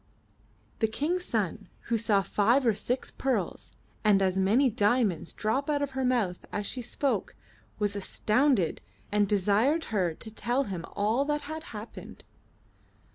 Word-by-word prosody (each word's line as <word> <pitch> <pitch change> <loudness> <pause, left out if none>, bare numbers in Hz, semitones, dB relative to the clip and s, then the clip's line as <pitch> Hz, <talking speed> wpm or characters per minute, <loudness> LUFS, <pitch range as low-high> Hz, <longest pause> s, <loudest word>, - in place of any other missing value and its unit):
The 220 - +3
King's 335 +11 -1
son 210 - -2
who 235 - -1
saw 210 -3 +2
five 235 +8 +2
or 230 - +4
six 240 +5 -2
pearls 265 -1 -2 0.3
and 210 -2 +5
as 190 -1 +1
many 205 +8 +4
diamonds 205 -6 +1
drop 260 +7 -1
out 290 -1 +1
of 280 - -3
her 265 0 -2
mouth 235 -8 0
as 205 - -2
she 250 - -2
spoke, 245 -2 -2 0.4
was 205 -1 0
astounded 215 - +1 0.3
and 205 0 +3
desired 210 - +2
her 180 -6 +1
to 220 +5 -8
tell 245 +4 0
him 185 -8 -5
all 220 +6 +2
that 295 0 0
had 315 +2 -6
happened. 215 +1 -9
220 Hz, 150 wpm, -28 LUFS, 200-265 Hz, 0.4 s, and